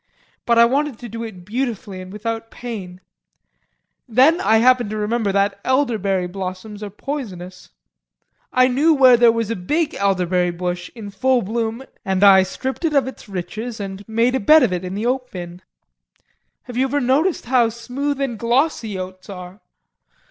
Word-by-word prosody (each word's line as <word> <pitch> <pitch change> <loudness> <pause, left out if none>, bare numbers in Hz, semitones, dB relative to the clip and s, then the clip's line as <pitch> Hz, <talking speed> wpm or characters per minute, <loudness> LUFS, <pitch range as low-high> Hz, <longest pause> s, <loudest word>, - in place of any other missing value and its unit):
But 235 -1 +3
I 235 - +8
wanted 275 +1 0
to 240 - -9
do 230 +2 -6
it 190 -6 -9
beautifully 215 -4 -3
and 185 0 -10
without 225 +2 -4
pain. 195 -7 -8 1.1
Then 265 +9 +4
I 220 +3 +4
happened 245 -1 +4
to 215 - -4
remember 210 0 0
that 200 0 +1
elderberry 220 -9 +1
blossoms 190 +3 -6
are 210 - -5
poisonous. 195 -7 -7 0.8
I 255 0 +4
knew 295 +6 +3
where 260 -3 +7
there 235 -1 +6
was 230 -1 -2
a - - -1
big 300 - -1
elderberry 180 -2 +1
bush 175 0 -4
in 210 -3 -8
full 250 +5 +1
bloom 225 +4 -3 0.2
and 190 0 0
I 195 -1 +8
stripped 260 - -4
it 315 -3 0
of 275 - +4
its 265 - -9
riches 215 +6 -5
and 195 0 -6
made 230 +3 +2
a 265 - +1
bed 305 +8 +6
of 215 -7 +1
it 180 0 -3
in 185 +1 -5
the 210 +3 -3
oat 255 0 -1
bin. 175 -1 -8 1.0
Have 245 - -10
you 260 - +3
ever 285 +2 0
noticed 285 +8 +1
how 240 -2 +3
smooth 260 +5 -4
and 255 -6 -2
glossy 235 -3 0
oats 185 +1 -8
are? 180 +1 -9
225 Hz, 175 wpm, -20 LUFS, 190-255 Hz, 1.1 s, I